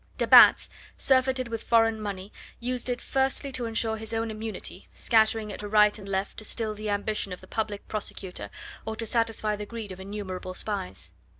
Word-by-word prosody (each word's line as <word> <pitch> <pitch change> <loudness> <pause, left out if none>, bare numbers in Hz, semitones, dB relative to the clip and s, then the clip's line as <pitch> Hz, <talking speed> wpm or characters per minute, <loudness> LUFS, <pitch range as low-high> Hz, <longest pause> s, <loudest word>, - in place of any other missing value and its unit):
De - - +1
Batz, - - +8 0.3
surfeited 260 -1 +2
with 225 -1 -3
foreign 225 -1 +3
money, 200 -1 -5 0.3
used 250 +1 -2
it 245 0 -1
firstly 270 +1 -1
to 250 -2 -2
ensure 225 0 0
his 220 +1 -5
own 225 0 -1
immunity, 220 0 -6
scattering 220 -2 +2
it - - -7
to 210 - -4
right 210 0 +4
and 200 -1 -9
left 195 0 -2
to - - -6
still 215 0 0
the 210 0 -5
ambition 205 0 -1
of 180 - -5
the - - -13
Public 210 0 -3
Prosecutor 190 - -5 0.3
or 220 0 -4
to 225 - -3
satisfy 225 -2 0
the 210 0 -6
greed 225 -3 -6
of 185 - -8
innumerable 190 -2 -6
spies. 95 - -3
215 Hz, 190 wpm, -27 LUFS, 205-225 Hz, 0.3 s, Batz